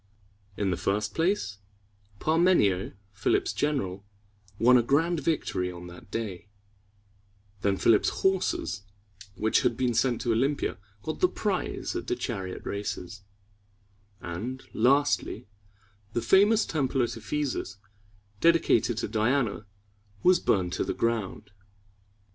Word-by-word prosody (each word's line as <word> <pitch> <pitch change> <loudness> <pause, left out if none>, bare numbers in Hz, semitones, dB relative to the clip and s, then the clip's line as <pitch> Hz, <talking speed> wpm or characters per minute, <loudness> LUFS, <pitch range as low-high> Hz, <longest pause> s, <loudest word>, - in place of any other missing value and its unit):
In 100 -2 0
the 90 - -1
first 105 +1 -1
place, 165 - 0 0.6
Par 155 +9 +1
me´ni 175 - +5
o, 90 +1 -5 0.2
Philip's 100 - +1
general, 100 -11 -1 0.5
won 125 +3 +6
a 125 - +6
grand 160 +7 +2
victory 135 - -1
on 90 0 -9
that 90 +2 -12
day; 105 -4 -4 1.1
then 100 -2 +1
Philip's 110 0 +4 0.2
horses, 190 - +1 0.5
which 110 +3 +2
had - - +1
been 125 -2 +1
sent 120 +1 +1
to 120 - 0
Olympia, 135 +3 0 0.2
got 155 - -4
the 365 - +5
prize - - -2
at 355 - -4
the 365 - 0
chariot 95 - -5
races; 100 -1 -5 1.0
and, 110 +11 -5
lastly, 140 -3 +2 0.7
the 120 - 0
famous 210 +3 +5
temple 135 -4 0
at 120 - -2
Ephesus, 115 -3 -3 0.6
dedicated 165 -8 +3
to - - -1
Diana, 110 -2 0 0.6
was 185 0 +5
burned 90 -3 +1
to - - 0
the - - -3
ground. 110 -3 -2
115 Hz, 125 wpm, -28 LUFS, 100-150 Hz, 1.1 s, won